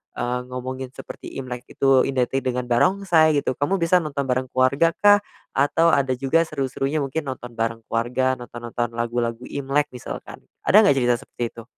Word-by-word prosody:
eee, 125 +1 -1
ngomongin 130 +1 -5
seperti - - -9 0.2
Imlek 125 -1 -7
itu 135 -1 +3
identik 135 0 0
dengan 125 -1 -2
barongsai 165 +2 +3
gitu, - - 0
kamu 160 +7 +1
bisa 180 +2 +4
nonton 145 -3 -3
bareng 130 0 -1
keluarga 135 +6 +2
kah? 205 0 +6 0.3
Atau 165 +4 +3
ada 135 -2 +2
juga 135 +5 +1
seru-serunya 140 +1 -2
mungkin 145 +3 -3
nonton 125 -2 -6
bareng 115 0 -3
keluarga, 125 +3 +1
nonton-nonton 120 -1 -5
lagu-lagu 120 0 -2
Imlek 140 +2 -1
misalkan. 125 - -8 0.2
Ada 210 +2 +6
ngga - - +5
cerita 125 -2 +2
seperti 120 - -7
itu? 115 - -11
130 Hz, 165 wpm, -23 LUFS, 120-145 Hz, 0.3 s, kah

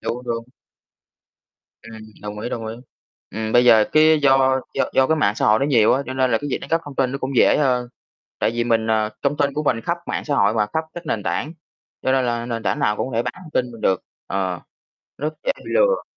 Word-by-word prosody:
Đúng, 125 +1 -4
đúng. 115 -1 -3 1.4
Ừm, 110 -1 -11 0.2
đồng 105 0 -6
ý, 120 - -4
đồng 115 -2 -4
ý. 110 - -5 0.6
Ừm, 110 +2 -4
bây 120 0 +5
giờ 110 -3 +6
cái 155 0 +5
do 135 -1 +4
do - - +1
do 130 0 +4
cái 160 - +2
mạng 105 -9 +2
xã - - -1
hội 105 0 +5
nó 140 - 0
nhiều 120 -7 +4
á, 135 - +1
cho 130 - -5
nên 130 -1 +1
là 115 - +2
cái 145 - -5
việc - - -1
đánh 140 - -10
cắp 165 - +2
thông 145 - -9
tin 130 -1 +1
nó 140 - -3
cũng 135 0 -4
dễ - - +5
hơn. 125 -4 +1 0.5
Tại 110 - +1
vì 120 0 -1
mình, 115 -1 +1
à 110 -1 +1
thông 140 +1 0
tin 140 -1 +1
của 150 - -2
mình 115 -6 +1
khắp 170 +7 -2
mạng - - -3
xã 145 - 0
hội 100 -3 +3
mà, 105 -2 +1
khắp 160 - 0
các 175 -1 -8
nền 110 -10 -2
tảng. 155 +5 -2 0.5
Cho 130 - +1
nên 130 -1 +2
là 120 -1 -2
nền 115 -2 -4
tảng - - -1
nào 105 - +1
cũng 130 - -2
có - - -8
thể 120 - +1
bán - - -3
thông 170 -4 -13
tin 125 -1 0
mình 115 -2 -12
được. 95 -1 +1 0.2
Ờ, 95 -2 -2 0.6
rất 150 +2 -3
dễ - - +2
bị - - -9
lừa. - - +3
125 Hz, 260 wpm, -21 LUFS, 110-140 Hz, 1.4 s, giờ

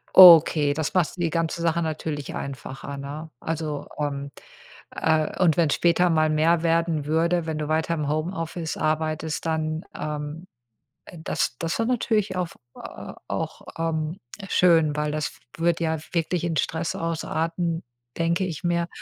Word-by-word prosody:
Okay, 165 -5 +9
das 155 0 -2
macht 180 0 +1
die 170 -1 0
ganze 165 +1 -1
Sache 170 0 +1
natürlich 155 -2 -4
einfacher, 140 +1 -6
ne? 145 +3 -7
Also, 155 -2 -3
ähm, 140 -1 -3 0.6
äh 160 -1 +1
und 165 -4 +4
wenn 165 -3 +3
später 175 +3 +3
mal 155 -1 +3
mehr 160 +2 +3
werden 165 -3 +1
würde, 165 +2 +1
wenn 155 -1 -2
du 150 - -2
weiter 160 +1 +1
im 150 -3 -2
Homeoffice 165 +1 -3
arbeitest, 155 0 -1
dann, 160 0 -1
ähm, 150 +3 -5 0.6
äh, 175 - -12
das - - -1
das 165 +3 -2
wär 225 - +2
natürlich 220 -5 0
auf 180 -2 -3 0.2
auch, - - -6 0.2
ähm, 165 +1 -2 0.3
schön, 165 -4 +4
weil 150 0 -1
das 150 0 -1
f - - -18 0.2
würde 170 0 +1
ja 160 0 0
wirklich 170 0 0
in 165 -2 -1
Stress 160 +2 -1
ausarten, 165 +1 -2 0.3
denke 170 +2 +1
ich 170 -2 -5
mir, 170 0 +1
160 Hz, 150 wpm, -25 LUFS, 155-170 Hz, 0.6 s, Okay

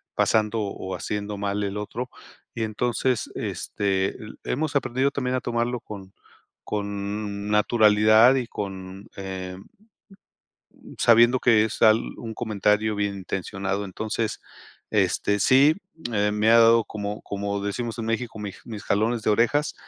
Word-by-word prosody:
pasando, 110 0 +2
o 95 -2 -4
haciendo 105 0 -4
mal 100 0 -2
el 100 0 -3
otro. 115 +4 -5 0.4
Y 115 - -3
entonces, 120 +3 -1
este, 95 -1 -1
eh, - - -11 0.3
hemos 150 +2 -2
aprendido 135 0 +1
también 130 -2 -2
a - - -3
tomarlo 120 +1 -1
con 100 -3 -10 0.5
con 100 0 -4
naturalidad 110 +2 +5
y 130 -2 0
con, 95 -1 -7
eh, 95 -2 -6
mm, 145 - -18 1.2
sabiendo 120 +2 +5
que 115 -3 +4
es 110 - -6
al 110 +1 +6 0.2
un 115 -1 -6
comentario 105 -1 0
bien 100 -1 -1
intencionado. 95 +1 -3
Entonces, 110 +3 -3 0.5
este, 105 0 +1
sí, 135 +8 +5 0.4
eh, 105 0 +1
me 105 +1 +2
ha 115 - +7
dado 115 0 +6
como 105 0 -5
como 100 0 -3
decimos 115 +4 -3
en 115 - -3
México, 115 0 -3
mi 105 -2 -5
mis 110 -4 -7
jalones 110 +4 0
de 110 - +1
orejas, 120 +8 +2
105 Hz, 140 wpm, -24 LUFS, 100-115 Hz, 1.2 s, ha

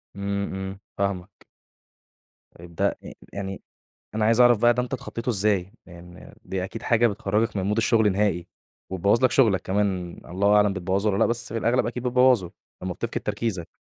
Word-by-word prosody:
إمم، 100 0 -3
إمم، 95 0 -5 0.2
فاهمك. 100 -1 -3 1.1
طيب 85 0 -13
ده - - +2 0.2
أ - - -9 0.2
يعني 95 -1 -5 0.5
أنا 110 0 +1
عايز 115 +2 +3
أعرف 120 -3 +6
بقى 120 +1 +4
ده 125 - 0
أنت 125 - -7
اتخطّيته 125 -2 -6
إزاي؟ 100 -3 0
يعني 90 0 -13
دي 95 -1 -3
أكيد 110 +4 -7
حاجة 120 0 +3
بتخرّجك 105 +1 -1
من 95 - 0
مود 105 +3 0
الشغل 110 -3 +3
نهائي، 95 -4 0 0.4
وتبوّظ 100 +7 +2
لك 130 - +5
شغلك 110 -8 +3
كمان 95 -3 -1
الله 100 +4 +2
أعلم 105 -1 +4
بتبوّظه 95 +2 0
والّا 95 - -1
لأ؟ - - +3
بس 115 -1 -3
في 115 - -1
الأغلب 120 +3 +1
أكيد 125 +1 -4
بتبوّظه 125 -7 +3 0.3
لمّا 90 -1 -3
بتفقد - - -4
تركيزك. 105 -5 -3
100 Hz, 180 wpm, -25 LUFS, 95-115 Hz, 1.1 s, أعرف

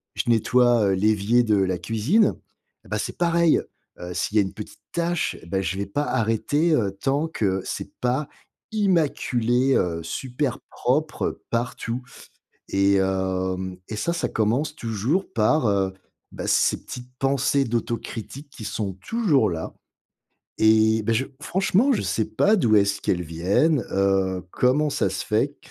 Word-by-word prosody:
je - - -2
nettoie, 120 0 +4
heu, - - +2
l'évier 105 +4 +3
de 110 -3 +2
la 95 -1 +1
cuisine, 115 - +2 0.5
et - - -16
bah, - - -1
c'est - - -4
pareil! 170 -1 +3 0.4
Heu, 90 0 -6
s'il 105 - -1
y - - +7
a - - +5
une 95 0 -6
petite 105 +1 -9
tâche, 170 -1 -1
bah, 95 +3 -1
je 95 +1 -2
vais 100 - -2
pas 145 +9 -1
arrêter, 145 +8 +1
heu, 105 -10 +1
tant 140 +8 0
que 95 - -1
c'est - - -5
pas 130 +4 0 0.4
immaculé, 135 - +1
heu, 85 -2 0
super 130 - -3
propre 150 +5 -1
partout. 120 0 -2 0.7
Et 100 0 +3
hem, 95 -1 -1
et 110 - -5
ça, 170 +10 -1
ça 170 - -1
commence 125 +8 0
toujours 115 - -1
par, 115 +5 +2
heu, 95 -2 +1 0.4
bah, - - -5
ces - - +2
petites 125 0 -8
pensées 135 +1 +2
d'autocritique 120 +3 -4
qui 125 -5 -10
sont 100 -2 -3
toujours 175 - +2
là. 80 -1 -5 0.8
Et 110 0 +4
bah, 115 +2 +1
je 130 +4 +1 0.2
franchement, 195 - +2
je - - 0
sais 110 - 0
pas 195 - +2
d'où 115 - +3
est-ce 100 0 +1
qu'elles 90 -1 0
viennent, 95 - +1
heu, 95 -1 +1
comment 145 +4 +2
ça 100 - +1
se 95 - -4
fait 135 +7 0
115 Hz, 155 wpm, -24 LUFS, 100-145 Hz, 0.8 s, y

